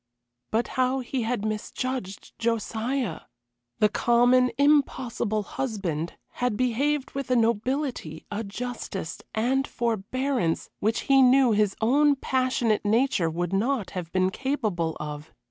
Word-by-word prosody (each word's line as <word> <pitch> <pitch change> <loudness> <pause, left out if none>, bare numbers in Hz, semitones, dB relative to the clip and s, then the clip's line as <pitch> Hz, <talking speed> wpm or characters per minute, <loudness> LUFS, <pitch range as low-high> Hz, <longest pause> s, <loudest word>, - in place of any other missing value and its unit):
But 225 +2 0
how 260 +1 +1
he 255 +1 -3
had 225 -2 -1
misjudged 215 0 -4
Josiah! 230 - -1 0.6
The 210 - +5
common, 245 +3 +4
impossible 260 -7 +2
husband 200 - -3 0.3
had 245 -4 +1
behaved 265 +4 0
with 275 -2 -5
a 255 - +3
nobility, 235 - -1
a 210 +2 -2
justice, 205 -5 -5 0.2
and 265 +5 +1
forbearance 235 -3 -1
which 220 +2 0
he 270 -1 +4
knew 260 -1 +6
his 210 -2 +2
own 285 +6 +4
passionate 255 -5 0
nature 215 -5 +2
would 175 +3 -3
not 225 +1 0
have 175 -3 -5
been 185 0 +2
capable 215 - -1
of. 150 0 -6
235 Hz, 125 wpm, -26 LUFS, 200-260 Hz, 0.6 s, knew